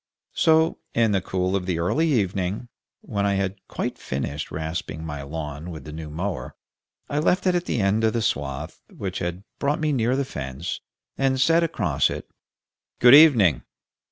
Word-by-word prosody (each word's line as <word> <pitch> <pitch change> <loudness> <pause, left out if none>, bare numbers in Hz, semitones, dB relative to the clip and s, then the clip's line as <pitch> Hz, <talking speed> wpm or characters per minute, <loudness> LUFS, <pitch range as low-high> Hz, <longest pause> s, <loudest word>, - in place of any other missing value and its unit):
So, 160 0 +3 0.2
in 115 -2 +3
the 95 -2 +2
cool 95 +1 -1
of 95 -2 -2
the 90 -3 0
early 150 - +1
evening, 100 -1 -1 0.3
when 100 -1 -2
I 100 0 +2
had 95 0 -2
quite - - -4
finished 70 +2 -4
rasping 80 0 -4
my 75 -3 -5
lawn 75 +2 -6
with 80 -5 -8
the 75 - -9
new 80 0 -7
mower, 90 +5 -4 0.5
I 145 - -1
left 180 +5 +2
it 185 - +4
at 175 0 0
the 120 - -1
end 105 +2 +2
of 110 - +3
the 115 -2 0
swath, 70 -1 -3
which 95 -2 -5
had 90 +1 -4 0.2
brought 145 +1 0
me 155 -1 +1
near 125 0 +1
the 140 0 0
fence, 70 - -5 0.4
and 135 -1 +2
said 165 +5 +4
across 165 - +1
it, - - -6 0.7
"Good 120 +1 +7
evening!" 120 - +7
95 Hz, 180 wpm, -24 LUFS, 80-130 Hz, 0.7 s, Good